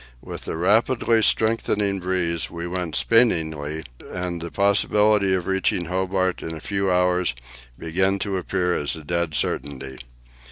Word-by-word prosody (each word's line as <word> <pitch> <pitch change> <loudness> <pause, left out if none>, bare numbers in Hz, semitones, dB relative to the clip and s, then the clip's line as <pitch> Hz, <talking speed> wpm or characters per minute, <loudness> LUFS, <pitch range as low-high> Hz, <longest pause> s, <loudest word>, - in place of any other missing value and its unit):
With - - -8
the - - -4
rapidly 110 +5 +3
strengthening 105 -3 +2
breeze 90 -2 -1
we 85 0 -6
went 90 -2 -3
spinningly, 80 -9 +1 0.3
and 90 -2 -4
the 85 - -5
possibility 100 0 +3
of 90 -2 -2
reaching 95 -2 0
Hobart 95 +1 -1
in 80 - -5
a - - -7
few 100 +1 -1
hours 90 -5 +2 0.4
began 95 +4 0
to 100 -1 -2
appear 90 0 -1
as 75 0 -1
a 80 - -10
dead 85 0 -1
certainty. 65 -2 -3
90 Hz, 145 wpm, -23 LUFS, 85-100 Hz, 0.4 s, rapidly